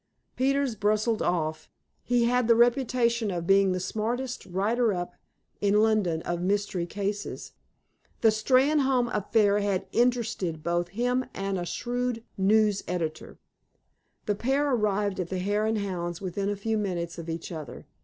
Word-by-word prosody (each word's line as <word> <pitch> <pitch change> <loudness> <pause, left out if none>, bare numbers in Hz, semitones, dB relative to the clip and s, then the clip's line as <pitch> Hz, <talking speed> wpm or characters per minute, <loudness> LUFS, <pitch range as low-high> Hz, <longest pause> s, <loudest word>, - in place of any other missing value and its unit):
Peters 275 0 +1
bustled 215 +1 +1
off. 160 -2 -1 0.3
He 245 -1 +1
had 245 0 +2
the 230 - +6
reputation 235 -2 +2
of 175 -3 -3
being 195 +1 +4
the 185 - -1
smartest 235 +7 -3
"writer 215 +6 +1
up" 175 -2 -3 0.5
in 205 +1 +3
London 200 -7 +1
of 175 0 -2
mystery 190 -2 -1
cases. 205 +2 -4 0.7
The 225 - +6
Steynholme 260 +2 +2
affair 210 0 +2
had 200 -2 -1
interested 230 -10 0
both 175 +1 0
him 245 +6 0
and 195 -1 -2
a 175 - -4
shrewd 245 +3 -2
news 205 +1 +3
editor. 165 -3 -4 0.9
The 210 - +1
pair 270 +7 0
arrived 205 -3 0
at 175 -2 -2
the 190 - -2
Hare 205 +3 0
and 220 0 +1
Hounds 175 -4 -3
within 195 +1 -3
a 205 - -1
few 220 +2 -1
minutes 175 -4 -3
of 165 0 -7
each 165 +1 -5
other. 155 -7 -8
205 Hz, 150 wpm, -27 LUFS, 180-235 Hz, 0.9 s, the